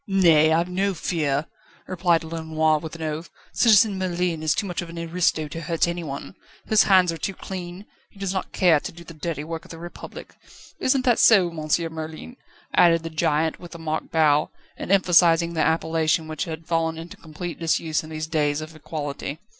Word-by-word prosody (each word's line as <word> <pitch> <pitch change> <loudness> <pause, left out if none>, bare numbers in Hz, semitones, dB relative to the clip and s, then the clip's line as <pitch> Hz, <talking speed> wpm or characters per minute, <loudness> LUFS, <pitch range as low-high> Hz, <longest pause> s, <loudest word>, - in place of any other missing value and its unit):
"Nay; 165 -6 +5
I've 165 +2 +2
no 190 +2 -1
fear," 150 -3 -1 0.4
replied 175 -2 +1
Lenoir, 160 -1 0
with 160 +1 -8
an 165 - -7
oath. 155 +2 -4 0.2
"Citizen 215 -3 +4
Merlin 180 -3 -1
is 155 +1 +1
too 205 - -1
much 180 -2 -3
of 175 - -8
an 170 - -9
aristo 170 -2 0
to 165 - -6
hurt 165 +1 0
anyone; 170 -4 -5 0.3
his 215 -1 +4
hands 185 -3 +5
are 165 - -6
too 195 - -3
clean; 180 +1 -7 0.2
he - - -22
does 195 -1 -3
not 190 - -3
care 170 -5 +4
to - - -7
do 170 +1 -13
the 165 - -11
dirty 155 -1 -4
work 165 +1 -6
of - - -16
the 165 - -9
Republic. 175 +1 -10 0.5
Isn't 260 0 +1
that 245 -3 +3
so, 190 -6 +6
Monsieur 165 +1 -1
Merlin?" 160 +9 -8 0.4
added 165 -2 +5
the 165 - -6
giant, 155 0 0
with 175 -1 -11
a - - -6
mock 160 -1 -4
bow, 150 -2 +3 0.3
and - - -5
emphasising 170 -3 +4
the 160 - 0
appellation 160 0 +1
which 155 -2 -3
had 160 -1 -7
fallen 165 -1 0
into 165 +1 -9
complete 165 +2 -7
disuse 160 -1 0
in 155 - -10
these 155 0 -4
days 150 -2 0
of 155 +1 -8
equality. 145 -2 -5
165 Hz, 195 wpm, -24 LUFS, 155-175 Hz, 0.5 s, so